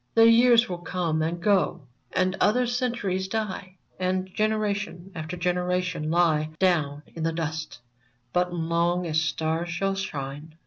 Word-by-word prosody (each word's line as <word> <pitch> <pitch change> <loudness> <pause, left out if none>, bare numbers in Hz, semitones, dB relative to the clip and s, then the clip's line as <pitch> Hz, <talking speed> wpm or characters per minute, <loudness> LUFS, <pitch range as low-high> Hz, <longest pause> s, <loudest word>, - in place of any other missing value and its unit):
The 225 0 +7
years 235 0 +6
will 180 -2 -4
come 170 -2 -1
and 165 +2 -1
go, 195 +1 +2 0.3
and 185 +1 +1
other 250 +4 +4
centuries 235 -7 -1
die, 190 -3 -4 0.2
And 185 0 0
generation 205 -4 -1
after 160 +1 -5
generation 180 -2 -1
lie 160 -2 +2
Down 155 -6 +1
in 165 - -7
the 165 +1 +1
dust; 160 -1 -4 0.6
but, 180 0 +1
long 170 +1 0
as 160 -1 +1
stars 160 +2 -1
shall 195 +3 0
shine. 150 -5 -5
180 Hz, 140 wpm, -26 LUFS, 160-195 Hz, 0.6 s, The